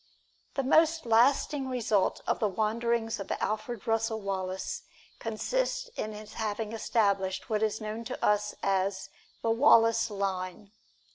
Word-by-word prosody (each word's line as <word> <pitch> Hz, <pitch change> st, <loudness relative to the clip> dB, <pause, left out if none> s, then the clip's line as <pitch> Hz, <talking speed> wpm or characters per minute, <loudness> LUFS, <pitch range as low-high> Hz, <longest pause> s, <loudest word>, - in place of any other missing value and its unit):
The 275 Hz, -, 0 dB
most 320 Hz, +3 st, +4 dB
lasting 265 Hz, +4 st, +3 dB
result 220 Hz, -6 st, +1 dB
of -, -, 0 dB
the 215 Hz, -, +2 dB
wanderings 225 Hz, +2 st, 0 dB
of 195 Hz, -, -6 dB
Alfred 215 Hz, 0 st, -3 dB
Russel 225 Hz, 0 st, 0 dB
Wallace 190 Hz, -2 st, -3 dB, 0.4 s
consists -, -, -1 dB
in 215 Hz, -, -3 dB
his 210 Hz, 0 st, -10 dB
having 215 Hz, 0 st, -3 dB
established 200 Hz, -4 st, 0 dB
what 215 Hz, -1 st, +1 dB
is 220 Hz, 0 st, 0 dB
known 215 Hz, +1 st, -5 dB
to 250 Hz, -, -3 dB
us 210 Hz, 0 st, +1 dB
as 195 Hz, 0 st, 0 dB, 0.3 s
"The 230 Hz, -, +2 dB
Wallace 230 Hz, -2 st, +5 dB
Line." 195 Hz, -1 st, -3 dB
220 Hz, 135 wpm, -29 LUFS, 200-235 Hz, 0.4 s, Wallace